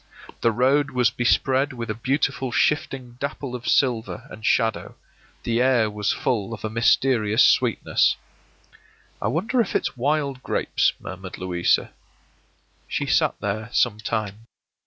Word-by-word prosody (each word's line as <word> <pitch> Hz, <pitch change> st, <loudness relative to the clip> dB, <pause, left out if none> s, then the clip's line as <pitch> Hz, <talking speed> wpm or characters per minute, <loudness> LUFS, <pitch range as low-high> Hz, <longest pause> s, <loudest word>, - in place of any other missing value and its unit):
The 115 Hz, -, +3 dB
road 135 Hz, +5 st, +2 dB
was 125 Hz, -4 st, +2 dB
bespread 130 Hz, +4 st, +1 dB
with 115 Hz, -3 st, -4 dB
a -, -, -1 dB
beautiful 130 Hz, +2 st, -1 dB
shifting 130 Hz, -4 st, 0 dB
dapple 140 Hz, -2 st, -4 dB
of 125 Hz, -1 st, -6 dB
silver 120 Hz, -5 st, 0 dB
and 110 Hz, -, -11 dB
shadow; 115 Hz, -2 st, 0 dB, 0.5 s
the 115 Hz, +1 st, 0 dB
air 125 Hz, -4 st, +3 dB
was 105 Hz, -1 st, -1 dB
full 115 Hz, -2 st, -1 dB
of 105 Hz, -, -8 dB
a 110 Hz, -, -3 dB
mysterious 115 Hz, -1 st, +3 dB
sweetness. -, -, +3 dB, 1.1 s
“I -, -, 0 dB
wonder 225 Hz, -, +1 dB
if -, -, -3 dB
it's -, -, -1 dB
wild 140 Hz, 0 st, -1 dB
grapes?” -, -, 0 dB
murmured 95 Hz, 0 st, -8 dB
Louisa. 90 Hz, -1 st, 0 dB, 1.0 s
She -, -, -2 dB
sat -, -, +2 dB
there 105 Hz, +2 st, -3 dB
some 105 Hz, -4 st, +2 dB
time. 110 Hz, 0 st, -4 dB
120 Hz, 135 wpm, -23 LUFS, 110-135 Hz, 1.1 s, The